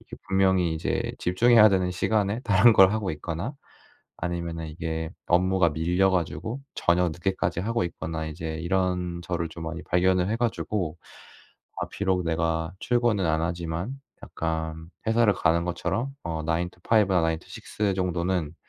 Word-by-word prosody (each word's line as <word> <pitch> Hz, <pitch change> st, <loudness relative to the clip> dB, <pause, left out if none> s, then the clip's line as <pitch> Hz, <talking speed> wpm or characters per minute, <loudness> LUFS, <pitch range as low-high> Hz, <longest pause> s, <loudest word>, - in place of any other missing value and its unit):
이게 -, -, -11 dB
분명히 95 Hz, -3 st, +2 dB
이제 80 Hz, -, -2 dB
집중해야 110 Hz, +4 st, +5 dB
되는 90 Hz, -2 st, +1 dB
시간에 105 Hz, +4 st, 0 dB
다른 110 Hz, 0 st, +5 dB
걸 95 Hz, -2 st, +7 dB
하고 105 Hz, -3 st, -1 dB
있거나 85 Hz, -, -4 dB, 0.6 s
아니면은 85 Hz, -2 st, -4 dB
이게 80 Hz, +1 st, -4 dB, 0.2 s
업무가 90 Hz, 0 st, +3 dB
밀려 90 Hz, +5 st, +2 dB
가지고 90 Hz, -, -2 dB
저녁 85 Hz, 0 st, +2 dB
늦게까지 90 Hz, 0 st, -1 dB
하고 115 Hz, 0 st, 0 dB
있거나 80 Hz, -2 st, -4 dB
이제 80 Hz, +1 st, -5 dB
이런 90 Hz, 0 st, -1 dB
저를 85 Hz, -1 st, -2 dB
좀 80 Hz, +1 st, -8 dB
많이 80 Hz, +1 st, -5 dB
발견을 90 Hz, +1 st, +2 dB
해 110 Hz, -, +1 dB
가지고 105 Hz, -8 st, -2 dB, 0.8 s
'아 -, -, -1 dB
비록 95 Hz, -2 st, 0 dB
내가 80 Hz, 0 st, -1 dB
출근은 120 Hz, -6 st, +1 dB
안 80 Hz, 0 st, +1 dB
하지만 85 Hz, +9 st, -3 dB, 0.2 s
약간 80 Hz, 0 st, -4 dB, 0.2 s
회사를 110 Hz, -3 st, +4 dB
가는 85 Hz, -1 st, +2 dB
것처럼 95 Hz, +9 st, -2 dB
어 80 Hz, -1 st, -3 dB
9 85 Hz, +2 st, -1 dB
to 90 Hz, -, -24 dB
5 105 Hz, -4 st, +4 dB
나 90 Hz, -, +5 dB
9 80 Hz, -1 st, +1 dB
to -, -, -20 dB
6 105 Hz, -2 st, -2 dB
정도는 90 Hz, -3 st, -1 dB
90 Hz, 310 characters per minute, -26 LUFS, 80-95 Hz, 0.8 s, 걸